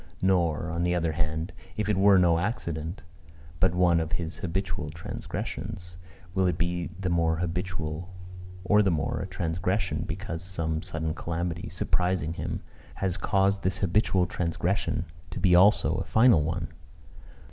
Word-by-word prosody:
Nor, 85 -3 +1
on 85 +1 -2
the 90 0 +2
other 85 -2 +1
hand, 80 +2 -2 0.2
if 105 -1 0
it 105 - +2
were 100 +1 +6
no 85 -2 +4
accident, 85 -4 -3 0.6
but 95 -2 +3
one 90 -2 +4
of 80 0 -2
his 85 -1 -3
habitual 90 -3 -3
transgressions, 85 +2 -6 0.4
will 95 -1 +2
it 90 -3 0
be 85 +1 -1
the 90 -2 -1
more 85 -1 +2
habitual 90 -1 -3 0.5
or 105 +2 +5
the 100 - +3
more 80 -3 0
a 95 - -4
transgression, 90 +2 -1
because 85 0 -4
some 80 -4 -2
sudden 80 -1 -3
calamity, 85 0 -3
surprising 90 -1 0
him, - - -4 0.3
has 95 -2 -1
caused 95 0 +2
this 95 +1 0
habitual 95 -1 +2
transgression 85 +2 -1 0.2
to - - -5
be 90 -3 +4
also 95 +4 +6
a - - -1
final 110 -7 +5
one? 85 +3 -2
90 Hz, 150 wpm, -28 LUFS, 80-95 Hz, 0.6 s, were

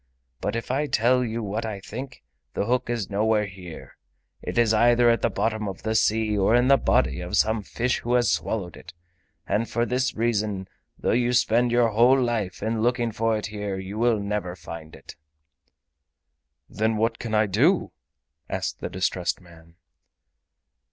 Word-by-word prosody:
But - - -2
if 115 +1 -3
I 145 +3 0
tell 125 0 +2
you 115 -1 -3
what 105 +2 -3
I 110 -3 -4
think, 130 +6 -8 0.3
the - - 0
hook 125 +1 0
is 115 -4 -2
nowhere 105 +1 +2
here—it 95 +1 -11
is 115 -2 +4
either 120 +2 +5
at 115 - 0
the - - +2
bottom 110 -2 -1
of 95 - -9
the 110 +1 -1
sea 110 -1 +2
or 100 +3 +3
in 125 +2 +3
the 140 - +7
body 65 - +1
of 90 +3 -2
some 110 0 +2
fish 120 +5 -1
who 120 +1 0
has 120 -1 +3
swallowed 95 -6 -2
it, 85 - -13 0.5
and 115 +2 -1
for 120 0 0
this 125 +1 -1
reason, 105 -4 -1 0.3
though - - -1
you 120 +1 +2
spend 120 0 +3
your 120 -1 +3
whole 120 +5 +4
life 110 -7 -2
in 110 0 -1
looking 120 0 +1
for 115 0 0
it 105 - -4
here, 105 -2 -4
you 95 +3 -6
will 115 -2 +3
never 100 -3 -3
find 80 -3 -9
it." - - -12 1.5
"Then 110 +1 -1
what 115 +1 0
can 115 -2 -3
I 110 0 +4
do?" 130 - +2 0.6
asked - - -3
the - - -4
distressed 90 -1 -1
man. 85 -2 -18
110 Hz, 175 wpm, -25 LUFS, 100-120 Hz, 1.5 s, the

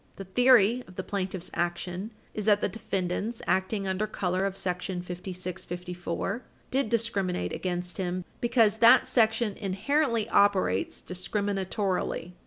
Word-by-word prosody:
The 195 - -7
theory 245 +2 +5
of 185 - -14
the 185 - -3
plaintiff's 190 -3 -3
action 175 +3 -2 0.2
is 210 - -4
that 205 -1 +5
the - - +1
defendants, 200 +1 -3
acting 195 +1 0
under 190 +3 0
color 185 -2 0
of 195 - -5
§ - - -6 0.5
5654, 180 +2 -4 0.3
did 265 -3 +1
discriminate 205 -6 -1
against 180 -1 -3
him 180 -1 -2
because 225 -3 +3
that 240 +3 +7
Section 225 -2 +2
inherently 225 +4 0
operates 190 - +2
discriminatorily. 190 -1 -2
195 Hz, 125 wpm, -28 LUFS, 180-220 Hz, 0.5 s, that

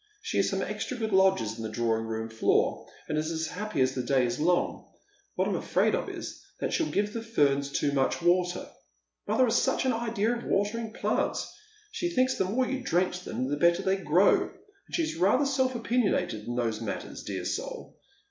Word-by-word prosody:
She - - -2
has - - +3
some - - -1
extra 255 - -4
good 220 -3 -2
lodgers 190 - +3
in - - -6
the 110 - -3
drawing 115 0 0
room 110 0 -3
floor, 110 0 +1 0.2
and 150 - 0
is 155 +1 -2
as 160 -1 -2
happy 190 -3 -3
as 130 0 +3
the 130 - -2
day 130 0 +2
is 120 +2 -2
long. 175 +3 +1 0.5
What - - +1
I'm - - 0
afraid - - +1
of - - -1
is - - -7 0.2
that - - -2
she'll 330 - +1
give 205 +1 0
the 230 - -3
ferns 140 -11 +1
too 145 - +1
niuch 135 -2 +1
water. 175 +1 +1 0.6
Mother 260 - +3
has 240 -2 +3
such 265 - +1
an 260 - +2
idea 230 0 0
of 240 - -6
watering 215 +3 0
plants. - - -1 0.4
She 425 -6 -2
thinks 255 -5 +2
the 190 - +1
more 240 +8 +1
you 265 0 -2
drench 180 -4 0
them 130 -7 -3
the 145 +2 -1
better 170 +4 +3
they 190 0 +2
grow, 180 +1 +4
and 400 -1 -12
she's 325 - -1
rather 200 - +3
self 260 -2 +1
opinionated 220 - 0
in 120 - -3
those 115 -2 -1
matters, 105 -4 -5
dear - - -4
soul - - -4
185 Hz, 205 wpm, -28 LUFS, -, 0.6 s, grow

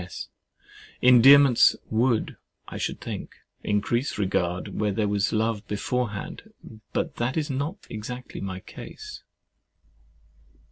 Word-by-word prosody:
S. 90 +1 -8 0.7
Endearments 125 +1 +7 0.2
would, 115 +1 +1 0.3
I - - -7
should - - -3
think, - - -7 0.3
increase 120 +6 0
regard, 90 -3 -1
where 105 -1 +1
there 105 +2 0
was 100 0 +1
love 110 -1 -1
beforehand; 110 0 -3 0.4
but - - -2
that 120 +4 -1
is 155 -2 -1
not 150 +9 -4
exactly 125 +4 -7
my 95 -1 -5
case. - - -10
115 Hz, 110 wpm, -26 LUFS, 105-125 Hz, 0.7 s, Endearments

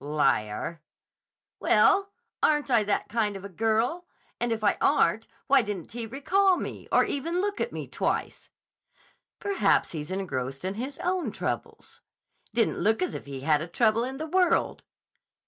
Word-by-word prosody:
"Liar." 145 0 0 0.8
"Well, 395 0 +4 0.3
aren't 295 -3 +2
I 235 -3 +5
that 200 - 0
kind 215 -2 0
of 195 - -10
a - - -7
girl? 225 - 0 0.3
And 240 -1 -1
if 220 -1 -2
I - - +3
aren't, - - +3 0.2
why 275 -1 +5
didn't 205 -6 -5
he 230 0 -4
recall 365 - +2
me, - - -6
or - - +5
even 335 +6 -2
look 410 +1 -1
at 480 - -1
me - - -6
twice?" - - -2 0.9
"Perhaps 400 -1 +2
he's 150 -1 -5
engrossed 140 -7 -3
in 190 - -1
his 260 +6 -5
own 360 -1 0
troubles." - - -5 0.5
"Didn't 230 +1 +1
look 220 - +2
as 365 - -2
if - - -7
he 135 -2 -6
had 150 +1 +2
a 165 - -4
trouble 225 +5 +2
in 260 +2 -4
the 315 - -4
world." 360 +2 +2
225 Hz, 165 wpm, -27 LUFS, -, 0.9 s, I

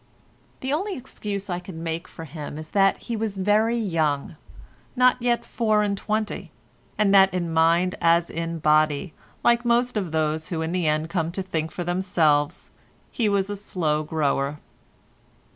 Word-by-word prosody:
The 265 +2 -1
only 385 +5 -2
excuse 205 -6 -5
I 175 -2 -2
can 180 -2 -9
make 165 +1 -3
for 165 - -9
him 150 0 -7
is 155 0 -8
that 195 -1 +3
he 235 - -3
was 215 -2 -3
very 215 +4 +2
young—not 170 - -1
yet 240 -1 +1
four 215 -3 +1
and 200 -1 0
twenty—and 210 -1 -3
that 195 -1 +7
in 175 -2 -2
mind 170 +3 +3
as 170 0 +4
in 165 0 -3
body, 155 +1 +2 0.3
like 240 0 +4
most 240 0 +2
of 185 -6 -2
those 155 0 0
who 160 -2 -2
in 160 - -3
the 180 -2 0
end 155 +2 0
come 165 -3 -1
to 190 - -3
think 160 -4 -2
for 175 - -5
themselves, 170 -3 +1 0.4
he 225 -3 +1
was 200 0 +1
a - - -2
slow 165 -6 -1
grower. 150 -2 -1
180 Hz, 160 wpm, -24 LUFS, 160-210 Hz, 0.4 s, that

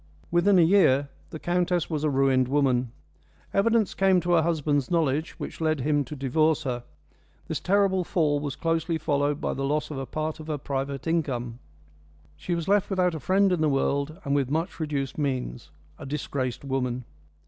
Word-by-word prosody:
Within 185 +3 +4
a 175 - +6
year 145 -6 +4 0.2
the - - -6
countess 175 +1 0
was 155 -3 -3
a 155 - +2
ruined 135 -2 +2
woman. 130 -3 +1 0.6
Evidence 220 +1 +2
came 190 -1 +3
to 175 - -1
her 170 -2 +5
husband's 150 -4 0
knowledge 160 -2 0
which - - -8
led 155 -3 +1
him 145 +1 +1
to 150 - -7
divorce 155 +4 +1
her. 125 -3 -3 0.6
This - - -2
terrible 195 -1 +2
fall 155 -5 +1
was 145 -2 -4
closely 165 0 0
followed 145 -1 0
by - - -2
the 135 - -4
loss 150 +2 -1
of 140 - -4
a 135 - -5
part 155 0 -3
of 155 - -9
her 155 -2 -2
private 135 -1 -4
income. 125 -8 -1 0.8
She 175 - -3
was 170 -1 -4
left 205 0 +2
without 180 -3 +1
a 160 - -4
friend 195 +4 +3
in 175 -3 +1
the 155 - +3
world 140 +3 0
and 140 - 0
with 140 -3 +1
much 165 +4 -2
reduced 145 -3 -3
means 125 - -3 0.3
a 140 - -8
disgraced 135 -3 -3
woman. 125 -2 -2
150 Hz, 185 wpm, -26 LUFS, 135-170 Hz, 0.8 s, a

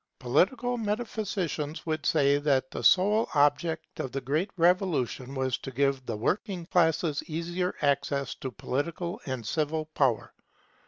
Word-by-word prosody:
Political 235 - +1
metaphysicians 205 -8 -3
would 155 -2 -2
say 145 -2 +3
that 135 -3 +1
the - - -5
sole 210 +4 +4
object 150 +3 +1
of 130 - -3
the 135 - -2
Great 150 - -1
Revolution 165 - +1
was 130 -1 -1
to - - -7
give 135 0 0
the 115 - -2
working 180 - -1
classes 165 -3 +2
easier 175 +3 -2
access 140 -2 +1
to 130 - -6
political 170 - -3
and 130 -4 -4
civil 155 +4 -1
power. 135 -8 0
155 Hz, 140 wpm, -28 LUFS, 135-180 Hz, -, sole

